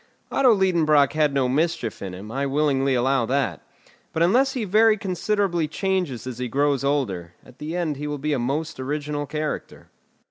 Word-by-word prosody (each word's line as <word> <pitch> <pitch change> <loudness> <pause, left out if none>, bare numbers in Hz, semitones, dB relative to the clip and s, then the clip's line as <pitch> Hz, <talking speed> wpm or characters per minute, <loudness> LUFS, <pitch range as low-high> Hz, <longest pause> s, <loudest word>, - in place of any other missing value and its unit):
Otto 265 -3 +4
Liedenbrock 155 -7 +3
had 155 -2 +2
no 135 -2 +1
mischief 140 -4 -1
in 95 -2 -5
him, 100 +4 -9
I 140 +3 -1
willingly 140 -2 +1
allow 125 -1 +1
that; 125 - -1 0.5
but 160 - +2
unless 260 +10 +3
he 250 - -2
very 215 +3 +4
considerably 190 -3 0
changes 180 - -2
as 125 -2 -6
he 125 - -2
grows 140 +2 +1
older, 100 -12 -1
at 125 - -18
the 155 +3 -5
end 160 -5 -1
he 150 +1 -4
will 150 0 -3
be 150 +2 -1
a 135 - 0
most 140 +5 -2
original 145 +2 -3
character. 150 +1 -5
145 Hz, 180 wpm, -23 LUFS, 130-170 Hz, 0.5 s, Otto